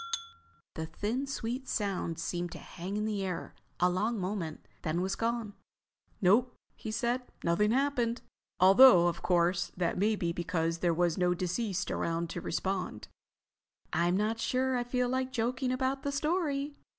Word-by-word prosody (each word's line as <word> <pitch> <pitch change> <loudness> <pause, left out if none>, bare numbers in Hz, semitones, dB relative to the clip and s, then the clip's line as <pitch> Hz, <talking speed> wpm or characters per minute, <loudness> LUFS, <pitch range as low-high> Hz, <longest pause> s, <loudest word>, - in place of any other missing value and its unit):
The 160 0 -4
thin, 235 - -2
sweet 260 0 -4
sound 190 -5 -1
seemed 175 +1 -3
to - - -7
hang 190 +3 -6
in 210 - -1
the 210 -2 -1
air 185 -3 -4 0.3
a 180 - +5
long 210 +5 0
moment, 180 -4 -4
then 155 +2 -1
was 190 +2 -1
gone. 230 -2 -2 0.7
"Nope," 230 +6 +3 0.2
he 220 - -7
said. 240 +3 0 0.2
"Nothing 170 +5 +2
happened. 245 -2 +1 0.4
Although, 190 0 +8
of 170 -1 -2
course, 175 0 +2
that 175 0 0
may 215 +2 +3
be 170 -4 -1
because 165 -1 -1
there 175 0 +2
was 170 +1 +1
no 180 0 +3
deceased 185 +1 -2
around 165 0 -1
to 175 - -4
respond." 185 - -3 0.8
"I'm 175 +3 +2
not 220 +2 0
sure 260 +2 +1
I 245 - 0
feel 250 0 0
like 260 +1 -1
joking 255 +1 -1
about 260 +1 0
the 280 - -2
story." 290 -1 -1
205 Hz, 160 wpm, -31 LUFS, 175-250 Hz, 0.8 s, Although